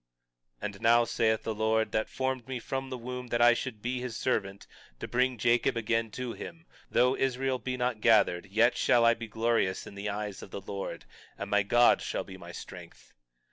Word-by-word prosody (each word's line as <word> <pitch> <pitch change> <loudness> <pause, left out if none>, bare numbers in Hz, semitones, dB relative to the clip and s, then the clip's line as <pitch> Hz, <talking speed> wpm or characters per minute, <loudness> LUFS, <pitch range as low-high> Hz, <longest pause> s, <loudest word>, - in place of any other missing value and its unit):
21:5 - - -1
And 105 -1 -6
now, 120 +1 +5
saith 110 -1 +1
the 110 - -2
Lord—that 110 0 0
formed 130 -2 -2
me 130 -1 -3
from 135 +3 -4
the 130 - -4
womb 125 +1 -6
that 120 0 -1
I 120 0 +7
should 120 -3 -5
be 125 +1 -1
his 125 -2 -5
servant, 100 -5 -2 0.3
to - - -5
bring 125 0 +1
Jacob 120 +1 +2
again 115 0 0
to 125 -2 -4
him—though 135 -6 -2
Israel 130 0 0
be 125 0 -3
not 125 -3 -1
gathered, 100 -5 +4
yet 115 +5 +3
shall 120 -1 +3
I 115 - +6
be 115 0 -7
glorious 110 -3 0
in - - -10
the 100 +1 -4
eyes 105 -1 -4
of - - -10
the 100 - -7
Lord, 100 0 -6 0.3
and 100 0 -6
my 105 0 +4
God 120 +5 +4
shall - - -3
be 95 - -11
my 85 -2 -10
strength. - - -11
115 Hz, 200 wpm, -29 LUFS, 105-125 Hz, 0.3 s, I